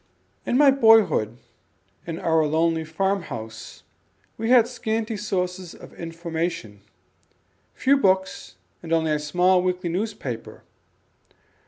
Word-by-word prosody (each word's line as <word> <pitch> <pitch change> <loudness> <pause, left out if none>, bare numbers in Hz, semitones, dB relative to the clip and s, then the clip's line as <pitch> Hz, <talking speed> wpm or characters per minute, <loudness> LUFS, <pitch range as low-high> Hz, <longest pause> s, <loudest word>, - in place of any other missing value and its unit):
In 245 - +2
my 285 -1 +6
boyhood, 220 - +4 0.7
in 165 -1 -4
our 160 -1 +2
lonely 160 +1 +1
farm 190 +5 -1
house, 110 -7 -9 0.5
we 225 +1 -3
had 245 -2 +6
scanty 225 -2 -3
sources 185 -3 -3
of - - -14
information; 165 - -5 0.9
few 275 +2 +3
books 190 - 0 0.3
and 165 - -9
only 160 -1 +1
a 150 - +1
small 180 +5 +2
weekly 180 -1 -2
newspaper. 180 - -5
180 Hz, 115 wpm, -23 LUFS, 160-215 Hz, 0.9 s, my